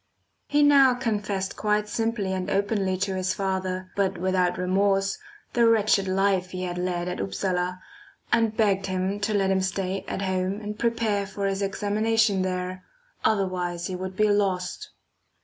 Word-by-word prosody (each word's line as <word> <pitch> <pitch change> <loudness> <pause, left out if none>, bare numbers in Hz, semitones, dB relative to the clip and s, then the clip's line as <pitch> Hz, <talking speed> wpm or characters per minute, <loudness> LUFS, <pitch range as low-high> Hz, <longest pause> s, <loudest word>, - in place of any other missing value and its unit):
He 290 0 +3
now 275 -3 +6
confessed 205 -5 -2
quite 210 0 0
simply 220 -3 -1
and 185 -1 -3
openly 200 -1 0
to 195 +1 -1
his 185 0 -1
father, 185 -1 -2
but 195 -2 0
without 180 0 +1
remorse, 195 +2 +1 0.3
the 235 -1 +4
wretched 215 -3 +3
life 190 -1 +1
he 185 0 -5
had 175 -1 -3
led 180 -1 -2
at 180 - -3
Upsala, 180 - -2 0.5
and 225 -2 +2
begged 195 -3 +2
him 190 +2 -1
to 210 +1 -1
let 195 -1 +2
him 190 0 +2
stay 190 0 -2
at 200 - -3
home 190 +1 -1
and 210 0 -6
prepare 225 -4 0
for 200 0 -4
his 195 0 -1
examination 210 +1 +1
there, 185 0 -3 0.4
otherwise 180 -4 0
he 185 - -3
would 185 +1 -5
be 215 +2 +3
lost. 200 - -1
195 Hz, 160 wpm, -25 LUFS, 185-210 Hz, 0.5 s, now